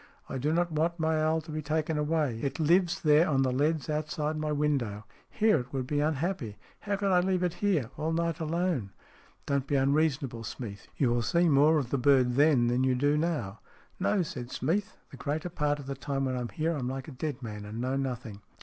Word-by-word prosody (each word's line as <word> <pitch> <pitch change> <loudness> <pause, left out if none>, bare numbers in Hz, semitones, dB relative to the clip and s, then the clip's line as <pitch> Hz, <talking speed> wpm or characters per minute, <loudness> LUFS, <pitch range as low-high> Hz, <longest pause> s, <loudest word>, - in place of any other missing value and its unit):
" - - -30
I - - -2
do 145 +4 0
not 175 +1 +1
want 165 +3 0
my 160 -1 +1
owl 160 +1 +2
to 155 +1 -10
be 155 0 -3
taken 155 +1 -1
away. 150 -5 0
It 140 +1 -3
lives 175 +3 +2
there 155 +2 +5
on 135 -2 +3
the 130 - +1
leads 150 +3 0
outside 155 0 -2
my 155 0 -2
window. 135 -8 -1 0.2
Here 215 -7 +3
it 125 +1 -7
would 130 -2 -2
be 145 +3 -1
unhappy. 150 - -1 0.2
How 205 -1 -2
could 200 -1 0
I 180 - +5
leave 185 0 +1
it 175 -2 0
here 165 - +1
all 160 +1 -1
night 170 +1 -1
alone? 160 - -1 0.2
" - - -27
" - - -36
Don't 140 -1 0
be 145 - 0
unreasonable, 135 -3 +1
Smeath. 105 -2 -7
You 130 -4 +2
will 120 0 +1
see 170 +8 +2
more 150 +1 +5
of 130 -5 -2
the 140 - +1
bird 130 -2 +4
then 140 -2 +4
than 120 +2 +1
you 130 -1 +2
do 145 +3 +2
now." 150 - -1 0.2
" - - -32
No," 190 0 +2
said 125 -6 -6
Smeath. 195 +13 -1
" - - -37
The 135 - -10
greater 155 +5 -3
part 150 -3 0
of 145 - -9
the 140 - -3
time 135 +1 -2
when 130 -1 -1
I'm 125 -1 -3
here 165 +1 -1
I'm 130 -4 -3
like 135 0 -5
a - - -7
dead 135 -1 -4
man, 105 -2 -6
and 105 +2 -7
know 130 +2 -1
nothing." 125 -6 -4
150 Hz, 240 wpm, -29 LUFS, 130-160 Hz, 0.2 s, there